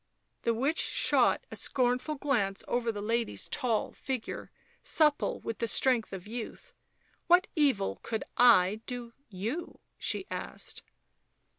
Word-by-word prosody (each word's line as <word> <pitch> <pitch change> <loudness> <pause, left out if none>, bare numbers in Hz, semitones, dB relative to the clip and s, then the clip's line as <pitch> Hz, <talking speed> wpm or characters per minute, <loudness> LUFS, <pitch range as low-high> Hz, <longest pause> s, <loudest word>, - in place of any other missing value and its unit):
The 230 - +1
witch 275 +8 0
shot - - +3
a - - -6
scornful 255 +4 +1
glance 235 -9 0
over 240 -1 0
the 205 -2 -6
lady's 225 - -1
tall 230 -4 0
figure, 260 -4 -5 0.3
supple 300 -2 +2
with 225 -2 -5
the 230 - 0
strength 245 -2 +2
of 190 -2 -7
youth. 240 - -7 0.3
" - - -38
What 355 +1 +6
evil 275 - +1
could 220 -1 -3
1 220 -4 +5
do 240 -2 -6 0.2
you 220 - -5
?" - - -48
she - - -2
asked. - - -5
240 Hz, 140 wpm, -30 LUFS, 220-270 Hz, 0.3 s, What